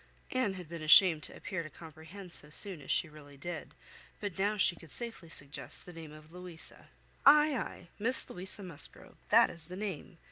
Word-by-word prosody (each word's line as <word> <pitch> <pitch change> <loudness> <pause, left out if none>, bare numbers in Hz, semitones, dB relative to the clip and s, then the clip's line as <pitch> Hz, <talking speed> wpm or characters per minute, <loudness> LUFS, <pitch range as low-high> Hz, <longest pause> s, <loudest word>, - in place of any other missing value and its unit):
Anne 255 -6 +1
had 180 -3 -8
been 165 0 -7
ashamed 155 +1 +7
to - - +3
appear 185 -2 -4
to 155 - -8
comprehend 165 +4 -10
so 150 - -2
soon 180 +1 +3
as 135 - -13
she - - +2
really 145 -2 -14
did; 165 +2 -7 0.4
but 200 -3 -5
now 205 +2 +1
she 190 -3 +3
could 165 - -15
safely 230 -6 -6
suggest 140 -3 -3
the 180 - -11
name 160 -2 -9
of 155 +1 -14
"Louisa." 180 -2 -9 0.4
"Ay, 300 +1 +7
ay, 180 -7 -5
Miss 250 +5 +4
Louisa 190 +3 -7
Musgrove, 170 -6 -9
that - - +6
is 165 -1 -7
the 180 - -8
name. 190 -4 -5
175 Hz, 190 wpm, -32 LUFS, 155-195 Hz, 0.4 s, ashamed